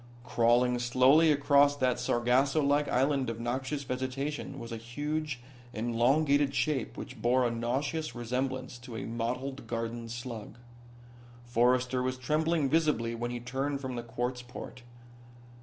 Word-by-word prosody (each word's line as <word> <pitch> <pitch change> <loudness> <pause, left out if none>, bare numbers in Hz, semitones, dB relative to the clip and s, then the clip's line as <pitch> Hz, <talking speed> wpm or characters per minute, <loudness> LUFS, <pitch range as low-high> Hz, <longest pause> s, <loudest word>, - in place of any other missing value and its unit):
Crawling 120 +1 +3
slowly 130 +6 +5
across 145 0 +4
that 130 -3 +1
Sargasso 125 +4 +2
like 145 +1 +2
island 135 0 +1
of 115 0 -4
noxious 130 +4 -2
vegetation 135 +2 -3
was 115 -3 -8
a 115 - -3
huge, 145 +4 -3 0.3
elongated 135 +5 +2
shape 145 -6 -1
which 130 -4 -8
bore 125 +2 +3
a 120 - +1
nauseous 130 +5 -2
resemblance 125 +1 -3
to 125 -1 -9
a - - -4
mottled 125 +3 -3
garden 115 0 -4
slug. 120 -2 -7 0.9
Forrester 125 +2 +2
was 130 0 -1
trembling 155 +3 +1
visibly 150 -7 +1
when 120 +1 -3
he 120 0 -4
turned 135 +4 -2
from 130 -2 -5
the 120 - -3
quartz 125 +2 -3
port. 125 0 -9
125 Hz, 140 wpm, -30 LUFS, 120-140 Hz, 0.9 s, slowly